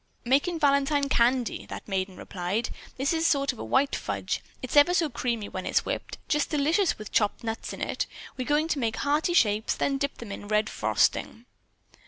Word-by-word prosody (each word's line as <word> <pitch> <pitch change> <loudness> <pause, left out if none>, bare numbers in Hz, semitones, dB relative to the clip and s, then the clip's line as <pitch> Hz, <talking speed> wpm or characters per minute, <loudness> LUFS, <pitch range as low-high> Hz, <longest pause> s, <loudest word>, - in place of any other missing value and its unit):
"Making 285 +7 +2
Valentine 280 -1 +2
candy," 245 0 +1
that - - -8
maiden 190 -2 -2
replied. 190 +5 -3 0.3
"This 270 +4 +1
is 325 0 +2
a - - +4
sort 275 -2 +2
of 245 - -14
a - - -4
white 275 +1 +2
fudge. - - -3 0.2
It's 255 - -4
ever 295 +5 +6
so 325 -4 +2
creamy 235 -3 -2
when 185 - -5
it's - - +2
whipped. - - -4
Just 300 -1 +1
delicious 320 +5 +2
with 215 -1 -9
chopped 210 +1 +1
nuts 225 0 -4
in - - -8
it. - - -2 0.3
We're 255 - -3
going 300 +2 +2
to 300 - 0
make 225 -3 0
heart 295 +2 +1
shapes, 215 -5 +3
then 275 -1 0
dip 280 0 -2
them 230 -4 -8
in 205 - -7
red 215 +1 +1
frosting." 230 - 0
265 Hz, 200 wpm, -27 LUFS, 220-290 Hz, 0.3 s, ever